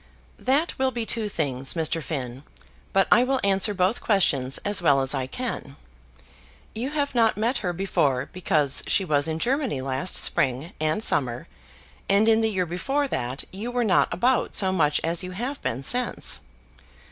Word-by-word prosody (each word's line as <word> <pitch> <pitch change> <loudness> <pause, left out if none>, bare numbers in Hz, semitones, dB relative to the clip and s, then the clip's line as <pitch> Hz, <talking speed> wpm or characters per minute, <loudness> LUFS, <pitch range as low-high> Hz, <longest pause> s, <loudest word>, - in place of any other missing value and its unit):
"That 280 +6 0
will 265 0 +2
be 235 -3 -4
two 220 -2 -1
things, 135 -6 -2
Mr. 165 0 0
Finn; 130 -4 -5 0.5
but 195 -1 +3
I 240 - +6
will 265 +1 0
answer 195 +1 +4
both 185 +4 +1
questions 140 - +1
as 205 -2 +1
well 145 -5 +4
as 135 0 +1
I 130 -2 -2
can. 190 - -5 1.0
You 235 +5 -3
have 285 -2 -2
not 230 -3 +3
met 230 +5 0
her 180 -4 -2
before, 145 -7 0
because 155 -6 +1
she 195 - +2
was 145 -2 +1
in 160 0 -2
Germany 255 - -1
last 135 +6 -1
spring 135 +5 0
and 155 +7 0
summer, 125 - +1 0.6
and 200 +3 +4
in 225 0 +4
the 220 - +2
year 190 -4 0
before 270 - -1
that 125 - -3
you 210 +5 -5
were 245 0 0
not 195 -5 +2
about 245 +9 +1
so 190 -2 +3
much 150 -5 +2
as 165 +1 -1
you 180 0 -6
have 250 +9 -4
been 125 +4 -3
since. 245 - 0
185 Hz, 175 wpm, -25 LUFS, 145-230 Hz, 1.0 s, I